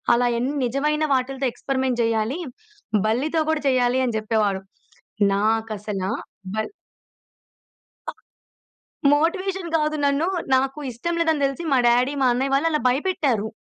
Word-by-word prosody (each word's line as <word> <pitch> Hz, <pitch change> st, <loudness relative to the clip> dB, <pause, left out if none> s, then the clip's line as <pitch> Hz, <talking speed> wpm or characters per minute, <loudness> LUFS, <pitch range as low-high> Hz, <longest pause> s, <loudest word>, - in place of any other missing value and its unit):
అలాయన్ని 245 Hz, +3 st, 0 dB
నిజమైన 300 Hz, +5 st, 0 dB
వాటిలతో 265 Hz, +1 st, 0 dB
ఎక్స్‌పరిమెంట్ 260 Hz, -1 st, -1 dB
చేయాలి. 225 Hz, +6 st, 0 dB, 0.7 s
బల్లితో 290 Hz, +9 st, +1 dB
కూడా 315 Hz, -2 st, -1 dB
చేయాలి 255 Hz, 0 st, +2 dB
అని 235 Hz, -3 st, -2 dB
చెప్పేవాడు. 215 Hz, -3 st, 0 dB, 0.7 s
నాకసలా 210 Hz, -2 st, -1 dB, 0.4 s
బల్ 220 Hz, 0 st, -2 dB, 1.4 s
అ! -, -, -3 dB, 1.0 s
మోటివేషన్ 360 Hz, +3 st, 0 dB
కాదు. 305 Hz, -1 st, +1 dB
నన్ను 285 Hz, +4 st, +2 dB, 0.3 s
నాకు 270 Hz, +2 st, 0 dB
ఇష్టం 335 Hz, +9 st, -3 dB
లేదని 320 Hz, -3 st, +1 dB
తెలిసి 275 Hz, +5 st, -3 dB
మా 260 Hz, -, +4 dB
డ్యాడీ, 250 Hz, +4 st, +3 dB
మా 255 Hz, -, +5 dB
అన్నయ్య 270 Hz, +2 st, 0 dB
వాళ్ళు 310 Hz, +4 st, +2 dB
అలా 300 Hz, -, 0 dB
భయపెట్టారు. 260 Hz, -, 0 dB
260 Hz, 120 wpm, -23 LUFS, 230-300 Hz, 1.4 s, మా